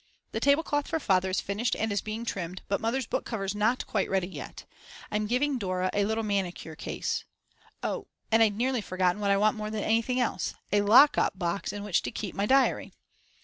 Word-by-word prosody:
The - - -2
tablecloth 290 0 +2
for 325 - -1
Father 190 -7 +2
is 185 - 0
finished 210 +5 -1
and 220 -1 -1
is 200 - 0
being 220 +2 -5
trimmed, 180 -4 -4
but 200 - -1
Mother's 240 +3 0
book - - -2
cover 220 -4 -4
is 195 0 -1
not 220 +4 +1
quite 200 -3 -1
ready 190 -2 +1
yet. 190 - -9 0.5
I'm 210 0 0
giving 260 +3 +1
Dora 185 -2 -1
a 205 0 +2
little 220 +2 -1
manicure 190 -6 -2
case. - - -3 0.6
Oh, - - -3 0.2
and 225 +1 +5
I'd 215 -2 +4
nearly 250 0 +1
forgotten 185 +1 0
what 200 - +1
I 200 - +4
want 215 +2 +2
more 215 0 -4
than 215 -1 -3
anything 230 +3 +1
else, 190 -7 -1 0.2
a 205 0 +4
lock 235 +8 +7
up - - +1
box 175 0 -2
in 205 0 -6
which 205 -4 +1
to - - -4
keep 205 -4 -5
my 200 +1 -1
diary. 270 +2 +2
210 Hz, 215 wpm, -28 LUFS, 195-230 Hz, 0.6 s, lock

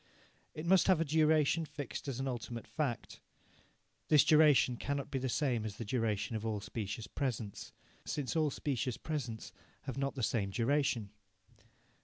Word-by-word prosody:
It 155 - -5
must 185 +1 +5
have 185 -4 +5
a 165 - +1
duration 155 +1 +3
fixed 145 -3 -6
as 135 -2 -3
an 135 - -1
ultimate 120 -2 -4
fact. 130 -7 -3 0.9
This 150 -3 +6
duration 150 -5 +5
cannot 140 +3 -3
be 135 - -1
the 130 0 -2
same 125 -4 0
as 105 -2 -4
the 115 - -5
duration 115 -1 -1
of 110 - -3
all 110 -2 -1
specious 110 +1 -5
presents, 115 -5 -4 0.3
since 145 -1 -3
all 155 -2 +3
specious 130 -3 -2
presents 130 -8 -4 0.3
have 135 -1 -5
not 140 +1 -1
the 130 - -3
same 105 -4 +1
duration. 115 -1 0
130 Hz, 160 wpm, -34 LUFS, 115-150 Hz, 0.9 s, This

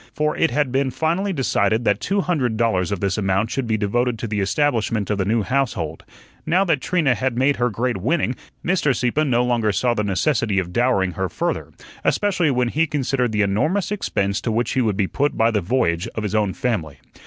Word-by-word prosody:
For 150 0 0
it 165 - +2
had 145 0 0
been 135 +1 +1
finally 170 +9 -1
decided 115 - +1
that 105 0 +2
two 200 +1 0
hundred 135 -12 0
dollars 105 -6 +1
of 100 - -2
this 100 0 0
amount 95 +2 0
should 135 -3 -2
be 110 -1 +1
devoted 120 +4 0
to 115 - -4
the 105 -1 -2
establishment 110 -1 0
of 100 - -1
the 95 - +1
new 110 +2 +1
household. 105 - -2 0.4
Now 185 +4 +2
that 160 -7 +1
Trina 160 -7 +2
had 130 -1 -2
made 135 +3 +2
her 125 0 +1
great 120 +1 -1
winning, 130 - 0 0.3
Mr. 170 -7 +2
Sieppe 125 +6 +1
no 125 -4 +2
longer 120 -3 +1
saw 120 +5 +1
the 105 - -1
necessity 105 +1 0
of 90 -2 -1
dowering 120 -6 +2
her 95 +1 -3
further, - - -3 0.3
especially 185 -6 +1
when 125 -2 +1
he 160 +6 +1
considered 135 -4 0
the 105 -1 +1
enormous 155 - 0
expense 100 - -1
to 115 - -2
which 115 +2 0
he 130 - +1
would 105 -5 0
be 100 - +2
put 145 +9 -1
by 115 +1 +3
the 105 -2 0
voyage 90 -4 0
of 110 - -3
his 105 -1 -3
own 105 -3 +1
family. 105 - -2
120 Hz, 215 wpm, -21 LUFS, 105-140 Hz, 0.4 s, by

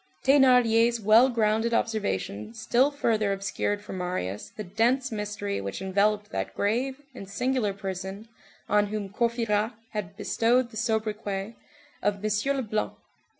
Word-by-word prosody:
Thénardier's 245 -4 +5
well 220 +5 +6
grounded 225 0 +1
observation 155 - -2
still 240 +5 +2
further 225 -8 0
obscured 200 +1 -2
for 210 - -8
Marius 180 - -3
the 215 - -7
dense 235 +7 +1
mystery 210 - -3
which 100 0 -5
enveloped 205 +2 +1
that - - -3
grave 250 +6 0
and 195 -6 -9
singular 250 0 0
person 195 +1 -6 0.4
on 210 0 +3
whom 205 -1 -4
Courfeyrac 230 -1 0 0.2
had 210 -5 -5
bestowed 240 +1 +1
the - - -12
sobriquet 215 -2 -2 0.5
of 205 -1 0
Monsieur 215 +6 +1
Leblanc. 215 -5 -2
215 Hz, 130 wpm, -27 LUFS, 200-235 Hz, 0.5 s, well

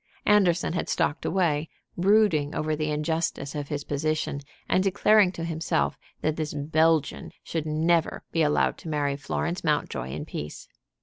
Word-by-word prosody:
Anderson 180 -5 +3
had 175 - -2
stalked 165 -2 0
away, 160 -5 +1 0.3
brooding 185 -6 +3
over 155 0 0
the 155 0 -2
injustice 150 -2 -1
of 145 -2 -4
his 145 -1 -3
position, 155 0 -1 0.3
and 185 - +2
declaring 200 0 +4
to 170 -2 -6
himself 165 -1 0 0.3
that 155 0 0
this 155 -2 -3
Belgian 155 +1 +1
should 160 -2 -3
never 160 +2 +1
be 165 - +1
allowed 150 -1 +2
to 165 - -8
marry 145 -2 0
Florence 170 +5 -3
Mountjoy 150 - -1
in 75 +3 -5
peace. 75 0 -7
155 Hz, 150 wpm, -26 LUFS, 150-170 Hz, 0.3 s, declaring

